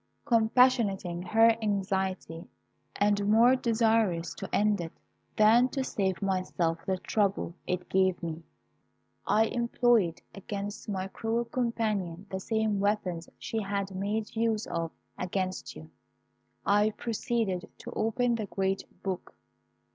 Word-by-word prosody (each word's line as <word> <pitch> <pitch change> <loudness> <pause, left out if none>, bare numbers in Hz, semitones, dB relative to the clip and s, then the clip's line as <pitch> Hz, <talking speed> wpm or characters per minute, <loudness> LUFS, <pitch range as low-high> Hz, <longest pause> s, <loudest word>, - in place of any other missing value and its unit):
"Compassionating 225 -7 +3
her 225 +5 +5
anxiety, 190 -5 -2 0.5
and 205 0 +2
more 235 +4 +6
desirous 225 -8 +1
to - - -7
end 205 -2 +2
it 165 -1 -6 0.4
than 230 +4 +6
to 270 -1 -2
save 195 -5 -1
myself 185 -3 0
the 190 -1 +1
trouble 195 -1 0
it 180 0 -2
gave 190 -2 +2
me, 165 -1 -4 0.9
I 220 +1 +4
employed 235 -6 +2
against 200 +1 -6
my 190 -2 -2
cruel 225 +4 -2
companion 215 -7 -2
the 190 - -2
same 220 0 0
weapons 195 -5 -1
she 225 - -3
had 200 -1 -2
made 210 +4 -2
use 225 -1 +1
of 165 -1 -2 0.3
against 185 0 -3
you. 80 +1 -11 0.7
I 205 +1 +4
proceeded 225 -5 -2
to - - -9
open 240 +2 +1
the 220 -3 -2
great 195 0 -1 0.2
book. 190 -2 -4
205 Hz, 125 wpm, -29 LUFS, 185-225 Hz, 0.9 s, more